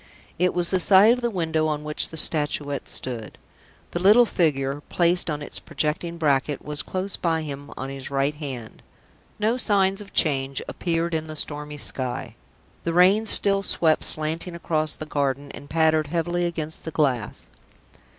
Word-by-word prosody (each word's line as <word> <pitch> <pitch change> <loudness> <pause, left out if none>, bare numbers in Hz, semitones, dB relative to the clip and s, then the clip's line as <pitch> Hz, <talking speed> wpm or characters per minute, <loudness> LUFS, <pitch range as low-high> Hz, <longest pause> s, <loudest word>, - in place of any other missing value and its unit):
It 180 0 +1
was 175 -1 +2
the 185 - +2
side 200 +5 +6
of 250 - -4
the 240 - 0
window 160 -5 -1
on 150 -1 -3
which 150 0 +1
the 160 - -9
Statuette 145 -2 +1
stood. 120 -4 -3 0.5
The 175 - -3
little 210 +6 +6
figure, 145 -8 0
placed 175 0 +3
on 150 -1 -3
its - - -1
projecting 170 +2 -3
bracket, 145 -2 0
was, 150 0 -1
close 190 +1 -4
behind 160 -2 -1
him 140 -1 -8
on 135 +1 -5
his 135 -1 -5
right 140 +1 0
hand. 135 -7 -8 0.6
No 220 +3 0
signs 195 -4 +1
of 200 - -12
change 135 -4 +1
appeared 170 -1 -2
in 160 0 -2
the 155 - -7
stormy 150 0 -5
sky. 130 -4 -2 0.5
The 165 - -2
rain 190 +5 +4
still 195 -1 +5
swept 165 -4 +2
slanting 160 +3 +1
across 155 -2 -1
the 155 - -7
garden, 140 -1 -2
and 145 - -12
pattered 160 -1 +2
heavily 175 +2 -1
against 160 -2 -4
the - - -5
glass. 135 -8 -1
155 Hz, 170 wpm, -23 LUFS, 145-175 Hz, 0.6 s, side